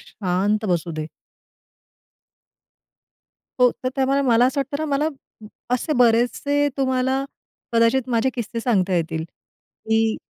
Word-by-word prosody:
शांत 200 +3 -1
बसू 170 -1 0
दे. 155 0 -4 2.5
हो. 250 -1 +6
तर - - +2
त्यामुळे 270 +1 +2
मला 240 -2 +4
असं 275 +2 0
वाटतं 280 +1 -3
ना, 315 - -2
मला 305 +2 +1 0.7
असे 305 +5 -2
बरेचसे 245 +5 +2
तुम्हाला 260 0 0 0.5
कदाचित 230 +2 +2
माझे 245 +2 +1
किस्से 230 -1 -4
सांगता 195 -6 +1
येतील, 160 -2 -1
की 220 +5 -3
235 Hz, 115 wpm, -22 LUFS, 210-265 Hz, 2.5 s, हो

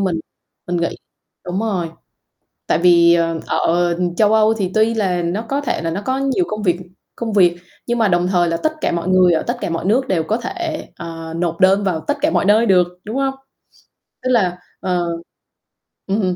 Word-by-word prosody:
mình, 180 -4 0 0.5
mình 175 - -1
nghĩ 170 0 -1 0.5
đúng 180 +2 -2
rồi, 190 -7 -1 0.8
tại - - +2
vì, 170 0 +5
ờ, 165 -1 0
ở, - - 0 0.4
ờ, 170 - -7 0.2
châu 215 0 +4
Âu 220 0 +4
thì 195 -4 -2
tuy 220 +1 +3
là 185 -5 0
nó 175 +5 -1
có 275 +5 -2
thể 275 - -2
là 165 - -2
nó 195 +5 -3
có 260 +1 0
nhiều 275 +6 +1
công 215 0 -4
việc 175 -3 +1 0.4
công 230 -2 -4
việc, 175 -4 +4 0.3
nhưng 240 - 0
mà 225 - +4
đồng 175 -1 +2
thời 175 -2 +2
là 165 - 0
tất 315 - -1
cả - - +1
mọi 170 +1 -2
người 185 -1 +5
ở 160 - +1
tất 240 +1 -2
cả - - -2
mọi 165 +2 -3
nước 255 +6 +2
đều 170 -4 +1
có 215 +8 -1
thể, 330 +2 -4
ờ, 165 -1 -7
nộp 170 -1 -2
đơn 195 +2 +4
vào 180 -5 0
tất 290 0 0
cả 305 - +2
mọi - - +1
nơi 215 +3 +4
được, 180 -4 +4 0.2
đúng 215 +3 -6
hông? 270 0 0 0.9
Tức 255 - -2
là 190 -8 +2 0.2
ờ. 180 -2 -1 1.0
Ừm. 195 -2 0
190 Hz, 215 wpm, -19 LUFS, 175-225 Hz, 1.0 s, vì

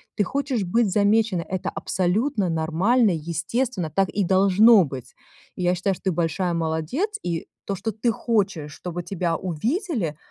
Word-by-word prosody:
Ты 205 - +2
хочешь 270 +1 -1
быть 210 +4 +1
замечена. 210 -2 +2
Это 185 +2 -3
абсолютно 200 +3 0
нормально, 180 +8 +2
естественно, 170 - -2
так 195 +5 +1
и 205 - 0
должно 195 +3 +6
быть. 130 -3 -8 0.4
И - - -6
я 180 +1 +2
считаю, 190 +2 0
что 190 - -12
ты 190 - +2
большая 170 +2 -1
молодец, 165 - -2
и 165 -1 -3 0.2
то, 200 - -2
что 220 +4 -3
ты 225 +3 0
хочешь, 195 -11 -1
чтобы 175 0 -6
тебя 175 -3 -1
увидели 200 - -2
190 Hz, 155 wpm, -24 LUFS, 170-225 Hz, 0.4 s, должно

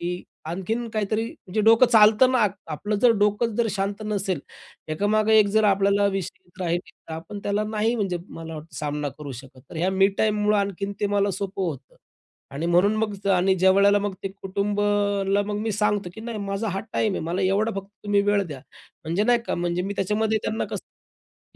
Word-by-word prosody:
की 180 +1 -3 0.2
आणखीन 220 +8 -3
काहीतरी 215 +1 -1
म्हणजे 215 -2 -4
डोकं 225 +3 +6
चालत 215 +1 +6
ना, 255 - +2
आप 210 -4 +3 0.2
आपलं 205 +7 -2
जर 245 - +7
डोकंच 210 +3 +2
जर 235 - +3
शांत 200 +2 -2
नसेल, 195 -6 -1 0.5
एकामागे 215 +6 +3
एक 210 - +5
जर 220 0 +4
आपल्याला 200 0 +3
विशेष 195 -2 -1
चिंता 180 +1 -9
राहील, 170 0 +1 0.3
तर - - -6
आपण 165 +6 -7
त्याला 205 +1 0
नाही 220 +2 +1
म्हणजे 195 -6 -1
मला 165 0 -8
वाटतं 155 +1 -10
सामना 150 -1 -2
करू 145 -2 -7
शकत. 135 -1 -17
तर - - -8
ह्या 180 +4 +1
मी 195 +1 +4
टाईममुळं 210 -1 +2
आणखीन 200 0 -2
ते 205 - +2
मला 200 0 +2
सोपं 195 +1 -4
होतं. 145 -7 -5 0.6
आणि 155 +4 -2
म्हणून 180 +5 +3
मग 210 -2 -3
आणि 190 +1 +3
ज्यावेळेला 200 +2 +5
मग 205 -1 -2
ते 195 - -2
कुटुंबाला 200 0 0
मग 210 0 -2
मी 220 0 -1
सांगतो 205 -2 0
की 220 - -9
"नाही, 230 -1 -5
माझा 200 +2 -3
हा 195 - -2
टाईम 215 -3 +1
आहे, - - -2
मला 175 +4 -1
एवढा 200 +4 +2
फक्त 195 - -21 0.2
तुम्ही 205 -1 +3
वेळ 205 0 +2
द्या." 145 -5 -8 0.4
म्हणजे 170 +6 0
नाही 240 +1 +4
का - - -1
म्हणजे 175 0 -1
मी 200 +2 -4
त्याच्यामध्ये 215 +3 +1
त्यांना 220 - -2 0.7
कसं - - -39
200 Hz, 200 wpm, -24 LUFS, 180-210 Hz, 0.7 s, जर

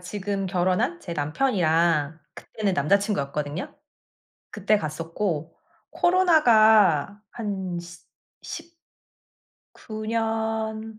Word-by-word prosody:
지금 195 +1 -4
결혼한 180 -2 0
제 170 - -7
남편이랑 160 - +1 0.2
그때는 210 -3 -3
남자친구였거든요. 150 -3 -1 0.8
그때 210 0 +1
갔었고. 165 0 -4 0.4
코로나가 220 - +4
한 195 -6 -4
시 175 0 -12 0.4
10 335 +1 -8 1.0
구 215 -1 -8
년 220 -1 -2
200 Hz, 185 characters per minute, -25 LUFS, 165-220 Hz, 1.0 s, 코로나가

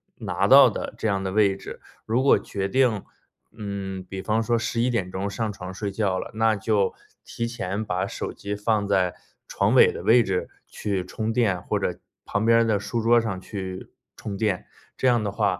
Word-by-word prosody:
拿 - - -1
到 - - +9
的 - - -5
这 - - -1
样 100 -2 0
的 95 - -2
位 100 -2 +3
置， - - -9 0.3
如 120 +4 +1
果 140 - +5
决 100 -1 -3
定， 120 -3 +2 0.5
嗯， 100 -3 -5
比 95 +1 -7
方 110 +3 +1
说 120 +1 +1
11:00 110 -5 -1
上 110 +1 -2
床 90 -1 -7
睡 100 +1 -4
觉 95 -2 0
了， - - -5
那 110 0 +2
就 100 -1 +1 0.3
提 115 - -4
前 110 -2 -3
把 90 -1 -1
手 - - -5
机 100 0 -5
放 105 -1 0
在 95 -3 +2 0.3
床 - - +1
尾 - - +7
的 - - -7
位 120 +1 +5
置 95 -1 -2 0.2
去 95 -3 -3
充 110 +4 -3
电， 105 -7 +1
或 - - -1
者 - - -2 0.3
旁 105 - -1
边 115 0 +5
儿 - - +4
的 110 -3 +1
书 105 +3 -3
桌 120 +1 +5
上 105 -5 -3
去 95 -1 -7 0.2
充 100 -2 -6
电， 100 -3 -1 0.3
这 130 - +1
样 120 -3 +3
的 100 - -2
话， 100 -3 0
105 Hz, 210 characters per minute, -25 LUFS, 95-115 Hz, 0.5 s, 到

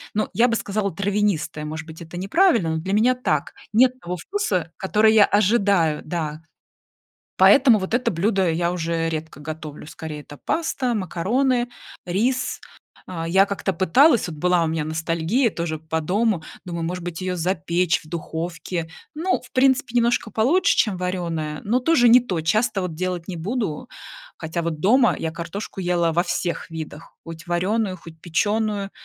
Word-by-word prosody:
ну, 215 - 0
я 240 +2 +4
бы 230 - 0
сказала 200 -2 -2
травянистая. 200 -6 -1
Может 155 +1 -5
быть 160 +1 -11
это 170 +1 -9
неправильно, 210 - +2
но - - -1
для 190 +3 -3
меня 230 +5 +4
так. 155 - -1 0.2
Нет 255 +2 +4
того 180 +1 -4
вкуса, 185 - -2
который 215 +3 +3
я 210 -2 +7
ожидаю, 200 -7 +2
да. 155 -2 -4 1.0
Поэтому 250 -6 +6
вот 190 +3 -5
это 250 - +1
блюдо 190 +1 +1
я 170 +1 0
уже 165 -1 -1
редко 160 -2 -5
готовлю, 155 -1 -8
скорее 155 -2 -7
это 145 0 -13
паста, 270 - -1
макароны, 240 - 0 0.4
рис. 235 +9 0 0.5
А, 165 -2 -4
я 190 +3 +5
как-то 200 -1 -2
пыталась, 235 - +4
вот 155 - -8
была 180 +1 +2
у - - 0
меня 160 -1 -2
ностальгия, 165 - 0
тоже, 170 -3 -3
по 160 +1 -2
дому, 195 +2 +1 0.2
думаю, 170 -2 -4
может 180 +1 -4
быть, 175 -1 -5
её 185 0 -2
запечь 170 0 0
в - - -16
духовке, 165 +1 -4 0.3
ну, 335 -2 0
в 250 - -17
принципе, 260 -2 +2
немножко 235 -1 +1
получше, 350 - +3
чем 210 -5 +2
варёная, 170 -4 -3
но 235 +5 +2
тоже 255 -2 +4
не 245 +2 +8
то. 185 -9 -3
Часто, 215 +5 +1
вот, 180 -3 -4
делать 180 0 -3
не 185 - -5
буду, 210 +4 -3 0.5
хотя, 165 +2 -3
вот 165 -2 -3
дома 235 - +4
я 160 - -2
картошку 175 +4 -6
ела 175 -2 +1
во 175 - +2
всех 175 -2 -3
видах, 160 0 -8
хоть 165 0 -9
варёную, 185 +3 0
хоть 165 -1 -14
печёную, 205 +3 0
180 Hz, 165 wpm, -22 LUFS, 165-220 Hz, 1.0 s, не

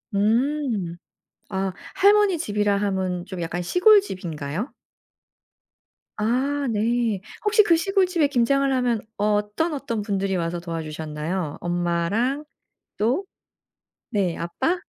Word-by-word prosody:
음. 225 - +1 0.5
아. 190 -1 -2 0.2
할머니 400 -2 +5
집이라 205 -5 +1
함은 190 -3 -1
좀 185 -2 -6
약간 170 +2 -3
시골집인가요? 190 - +2 1.4
아. 250 +7 +1 0.2
네. 225 -2 +1 0.2
혹시 425 0 +5
그 340 -4 +4
시골집에 365 -3 +2
김장을 275 +1 +2
하면 245 -3 +1 0.2
어떤, 210 +10 0
어떤 265 -6 -3
분들이 195 -2 -1
와서 170 0 -1
도와주셨나요? 160 0 -4
엄마랑 175 - 0 0.5
또? 250 - +1 0.9
네. 190 -6 0
아빠? 330 - -1
210 Hz, 220 characters per minute, -24 LUFS, 180-280 Hz, 1.4 s, 할머니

